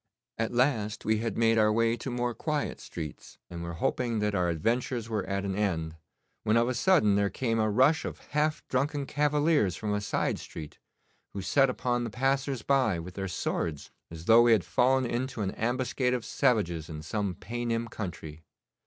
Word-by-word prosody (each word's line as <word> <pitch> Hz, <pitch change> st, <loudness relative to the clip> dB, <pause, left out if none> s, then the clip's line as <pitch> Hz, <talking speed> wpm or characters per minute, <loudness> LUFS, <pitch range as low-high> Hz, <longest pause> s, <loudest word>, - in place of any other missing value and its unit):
At 115 Hz, -, 0 dB
last 120 Hz, -4 st, 0 dB
we 110 Hz, 0 st, +2 dB
had 115 Hz, -2 st, -3 dB
made 115 Hz, 0 st, +4 dB
our 105 Hz, 0 st, +4 dB
way 115 Hz, +1 st, +2 dB
to 125 Hz, -, -5 dB
more 120 Hz, 0 st, -1 dB
quiet 150 Hz, +3 st, -2 dB
streets, 75 Hz, -4 st, -8 dB
and 85 Hz, -1 st, -6 dB
were 85 Hz, 0 st, -5 dB
hoping 120 Hz, +7 st, -1 dB
that 105 Hz, -1 st, 0 dB
our 90 Hz, -2 st, +1 dB
adventures 115 Hz, -, -1 dB
were 110 Hz, -3 st, -1 dB
at 100 Hz, 0 st, -2 dB
an 95 Hz, -, -1 dB
end, 85 Hz, -6 st, -1 dB, 0.5 s
when 110 Hz, +1 st, +2 dB
of 120 Hz, 0 st, +3 dB
a 130 Hz, -, 0 dB
sudden 125 Hz, -, +4 dB
there 100 Hz, 0 st, +2 dB
came 115 Hz, -1 st, -1 dB
a 110 Hz, 0 st, +2 dB
rush 130 Hz, +9 st, +4 dB
of -, -, -5 dB
half 150 Hz, +1 st, 0 dB
drunken 140 Hz, +2 st, 0 dB
cavaliers 145 Hz, -, +2 dB
from 105 Hz, -1 st, -2 dB
a 105 Hz, -, 0 dB
side 100 Hz, -, -1 dB
street, 75 Hz, -2 st, -9 dB, 0.5 s
who 100 Hz, -, -4 dB
set 135 Hz, +7 st, +3 dB
upon 120 Hz, -1 st, -1 dB
the 120 Hz, -, -3 dB
passers 135 Hz, +1 st, 0 dB
by 130 Hz, -9 st, +2 dB
with 85 Hz, +2 st, -7 dB
their 95 Hz, 0 st, -4 dB
swords, 80 Hz, -3 st, -3 dB, 0.2 s
as 80 Hz, 0 st, -9 dB
though 115 Hz, +3 st, +7 dB
we 120 Hz, -1 st, +6 dB
had 105 Hz, -5 st, +3 dB
fallen 130 Hz, +1 st, +2 dB
into 120 Hz, 0 st, -2 dB
an 95 Hz, -, -1 dB
ambuscade 125 Hz, +2 st, 0 dB
of 120 Hz, -, -4 dB
savages 90 Hz, -, +1 dB
in 75 Hz, -1 st, -7 dB
some 100 Hz, +2 st, -2 dB
Paynim 115 Hz, +3 st, -3 dB
country. 85 Hz, -8 st, -7 dB
115 Hz, 190 wpm, -29 LUFS, 100-125 Hz, 0.5 s, though